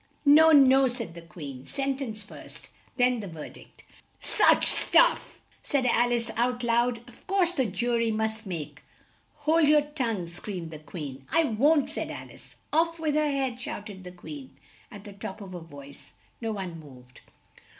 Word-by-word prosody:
"No! 315 +3 +7
no!" 270 -2 +6
said 240 -8 -5
the 170 - -10
Queen. 145 -6 -10
"Sen 275 -1 -1
tence 225 -6 -5
first - - -11 0.3
then 250 -1 +3
the 205 - -6
ver 160 -4 -8
dict." - - -17 0.4
"Such - - +4
stuff!" - - +4 0.2
said 280 -4 0
Al 240 0 +3
ice 235 -1 0
out 245 +1 0
loud. 235 0 +1
"Of 245 - -18
course 375 -3 +2
the 265 -8 0
ju 235 +5 -1
ry 230 0 +1
must 220 0 -2
make 165 -5 -6 0.3
" - - -37
"Hold 315 0 +4
your 300 0 +5
tongue!" 250 - -3
screamed 175 0 -6
the 155 - -8
Queen. 145 -3 -8
"I 330 - +4
won't!" 290 +4 +2
said - - -3
Al - - -8
ice. - - -15 0.2
"Off 330 +1 +2
with 310 -2 0
her 305 0 +2
head!" 265 -3 -2
shout 210 -3 -6
ed 190 -1 -11
the 180 - -9
Queen 265 - -10 0.3
at 205 -3 -11
the 205 -1 -10
top 195 +1 -7
of 195 -3 -9
her 175 - -6
voice. 145 -4 -12 0.3
No 225 -1 -2
one 185 -5 -6
moved. 125 -4 -15
230 Hz, 185 wpm, -27 LUFS, 180-275 Hz, 0.4 s, No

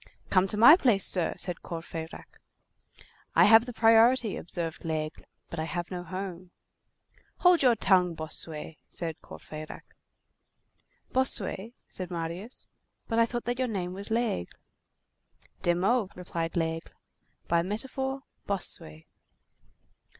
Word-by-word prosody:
"Come 185 0 +4
to 210 - 0
my 240 +9 +10
place, 235 - +3
sir," 180 -3 +2
said 180 -2 -3
Courfeyrac. 165 -1 -8 1.0
"I - - +7
have 225 +3 +7
the - - -4
priority," 225 0 +4
observed 165 -1 -4
Laigle, 155 -1 -3 0.2
"but 170 - -6
I 160 - -1
have 175 +3 -4
no 180 -1 -4
home." 185 0 -6 0.9
"Hold 360 -1 +6
your 250 -3 +5
tongue, 185 -4 +3
Bossuet," 155 0 -4
said 165 -2 -3
Courfeyrac. 155 0 -9 1.3
"Bossuet," 240 -3 +1
said 185 -2 -4
Marius, 175 +7 -5 0.4
"but 225 -1 0
I 230 - +5
thought 240 0 -3
that 245 +2 -2
your 255 - +1
name 185 -5 -3
was 200 +3 -6
Laigle." 225 - -1 1.0
"De 175 0 +2
Meaux," 200 +3 +1
replied 170 -2 -4
Laigle; 165 0 -2 0.5
"by 170 0 +3
metaphor, 265 +8 -3 0.2
Bossuet." 80 - -2
185 Hz, 125 wpm, -28 LUFS, 165-230 Hz, 1.3 s, my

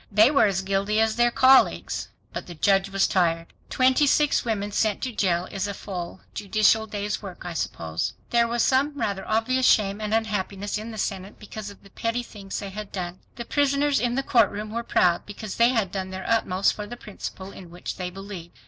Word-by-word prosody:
They 215 +6 +6
were 280 -7 +5
as 190 -1 -1
guilty 195 +2 0
as 220 -1 +2
their 240 +1 +4
colleagues. 260 +2 +4 0.2
But - - -5
the 175 - -8
judge 195 +4 +2
was 195 0 +2
tired. 165 -2 0 0.2
Twenty 260 +3 +3
six 295 +1 +3
women 210 -4 -2
sent 210 0 +1
to 260 - -2
jail 180 -5 0
is 195 0 -2
a 200 - -4
full 180 -2 -6
judicial 215 +2 +2
day's 210 -1 -3
work, 190 -4 -9
I 175 - -4
suppose. 80 - -3 0.2
There 235 -1 +4
was 235 0 +1
some 275 +3 +2
rather 195 -2 -1
obvious 255 +4 +2
shame 205 0 +3
and 210 0 -3
unhappiness 205 -2 -1
in 220 +2 -7
the 220 - -8
Senate 195 -1 -4
because 210 0 -8
of 200 - -14
the 195 - -17
petty 230 +4 -2
thing 200 -4 -12
they 200 -1 -6
had 210 0 -7
done. 180 -1 -5 0.2
The 235 - -6
prisoners 285 +1 +2
in 240 0 0
the 270 - 0
courtroom 215 -4 +2
were 230 +1 -2
proud 175 -6 +2
because 205 0 -7
they 235 +1 +5
had 225 -7 0
done 190 -1 -4
their 190 0 -6
utmost 195 -4 +2
for 210 -1 -6
the 240 - -8
principle 195 -3 -8
in 180 -3 -11
which 175 +1 -7
they 180 -1 -3
believed. 180 -6 -9
205 Hz, 210 wpm, -25 LUFS, 190-230 Hz, 0.2 s, They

